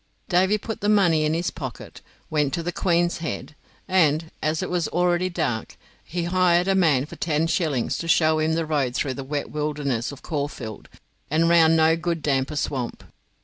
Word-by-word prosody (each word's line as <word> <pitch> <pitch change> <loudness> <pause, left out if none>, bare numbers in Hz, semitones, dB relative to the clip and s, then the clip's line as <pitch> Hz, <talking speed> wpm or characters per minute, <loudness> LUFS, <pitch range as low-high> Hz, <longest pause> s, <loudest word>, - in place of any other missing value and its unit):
Davy 190 +3 +3
put 225 +1 -6
the 205 - +1
money 175 -7 +4
in 155 +1 +1
his 170 +2 -1
pocket, 130 -8 -8 0.3
went 150 -2 +1
to 170 - -3
the 175 - -2
Queen's 175 -1 +1
Head, 160 -2 -5 0.3
and, 165 -4 +2
as 155 +1 0
it - - -4
was 175 -2 0
already 180 +1 +1
dark, 120 - -3 0.3
he 175 0 -4
hired 175 0 +2
a 195 - +3
man 155 -8 +3
for - - -11
ten 160 -1 0
shillings 155 -7 0
to 165 - -4
show 160 -1 +3
him 155 +1 +1
the 165 0 0
road 140 -5 -1
through 135 - -1
the 135 - -6
wet 145 +2 -4
wilderness 145 -5 -2
of 140 - -12
Caulfield 140 -8 -5 0.4
and 160 +3 +2
round 165 -1 +5
No 160 0 +4
good 170 -1 -3
damper 135 +1 0
Swamp. 130 -4 -3
160 Hz, 190 wpm, -24 LUFS, 145-175 Hz, 0.4 s, round